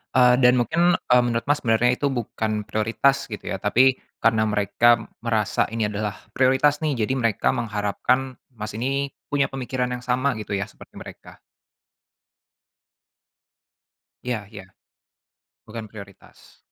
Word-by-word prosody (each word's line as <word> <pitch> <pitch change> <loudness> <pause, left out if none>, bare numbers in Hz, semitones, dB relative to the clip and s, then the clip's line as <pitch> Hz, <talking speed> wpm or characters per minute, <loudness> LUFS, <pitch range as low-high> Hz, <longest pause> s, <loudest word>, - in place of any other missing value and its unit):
eee, 125 -1 +6
dan 125 0 +7
mungkin, 170 +8 +2
eee, 125 0 +5
menurut 115 -1 -1
Mas 145 0 +3
sebenarnya 115 +2 +3
itu 140 - -1
bukan 110 -3 -3 0.2
prioritas 115 +6 +1
gitu 105 - -7
ya - - -1
tapi 125 +5 +4 0.2
karena 110 -1 +3
mereka 110 +2 +2 0.2
merasa 110 -3 +1
ini 115 -1 -1
adalah 105 0 -3 0.2
prioritas 135 +3 +3
nih 155 - +1
jadi 130 - -2
mereka 115 -5 0
mengharapkan 120 +4 -1 0.2
Mas 105 -3 -7
ini 135 +4 -2 0.2
punya 140 -1 +2
pemikiran 130 -1 -3
yang 125 - -9
sama 130 +3 +1
gitu 105 - -8
ya 100 - -2
seperti - - -17
mereka. - - -12 2.8
Iya 125 -2 -1
iya, 100 -3 -9 1.0
bukan 110 0 -7
prioritas. 100 -3 -14
120 Hz, 135 wpm, -23 LUFS, 110-130 Hz, 2.8 s, dan